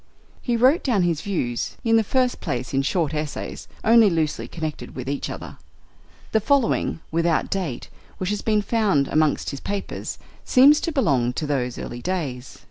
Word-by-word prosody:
He 240 -2 0
wrote 260 +8 +4
down 220 -9 +2
his 170 -3 0
views, 125 -12 -2
in 225 -2 +3
the 225 - +4
first 255 +3 +1
place, 125 +2 -3
in 135 - +2
short 155 +2 0
essays, 150 -1 -4 0.2
only 225 -1 +6
loosely 160 -4 -1
connected 155 -3 -6
with 130 -1 -6
each 140 +1 -2
other. - - -8 0.7
The 220 - +3
following, 265 - +1
without 165 0 +1
date, 180 -11 -3 0.3
which 185 +1 -2
has 210 - -2
been 215 -2 +1
found 200 - +2
amongst 155 -1 +1
his 140 - -6
papers, 200 +5 -4 0.3
seems 280 +4 +6
to 335 - -1
belong 135 - +1
to 155 - -3
those 125 -4 -1
early 120 0 -6
days. 140 -9 -4
170 Hz, 170 wpm, -23 LUFS, 140-225 Hz, 0.7 s, only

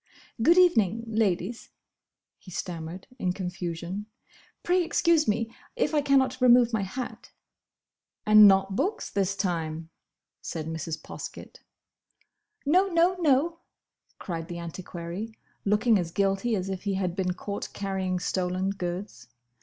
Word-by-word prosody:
"Good 335 +9 +5
evening, 230 - +4
Ladies!" 220 -1 -1 0.7
he - - -14
stammered, 175 0 -6
in 180 -3 0
confusion. 180 +1 -5 0.6
"Pray 360 +1 +3
excuse 330 -3 +2
me 225 +2 0 0.2
if 485 - 0
I 300 - +3
cannot 270 -2 +2
remove 245 -1 +6
my 220 - +1
hat." 245 +6 -6 1.0
"And 215 -1 +9
not 195 0 +3
books, 415 - -1
this 200 0 0
time?" 165 -4 -3 0.5
said 160 -2 -5
Mrs. 160 0 -4
Poskett. - - -9 1.1
"No, 365 +7 +4
no, 350 0 +3
no!" 325 +2 +2 0.6
cried 165 -3 -5
the 175 - -6
antiquary, 175 +4 -6 0.3
looking 210 +1 +3
as 170 -2 -2
guilty 195 +5 +1
as 185 -1 -2
if 190 -1 -4
he 200 -1 0
had 185 -2 -1
been 185 -2 -1
caught 200 +2 -5
carrying 190 -2 -2
stolen 185 +1 -1
goods. 180 - -5
195 Hz, 130 wpm, -27 LUFS, 180-240 Hz, 1.1 s, And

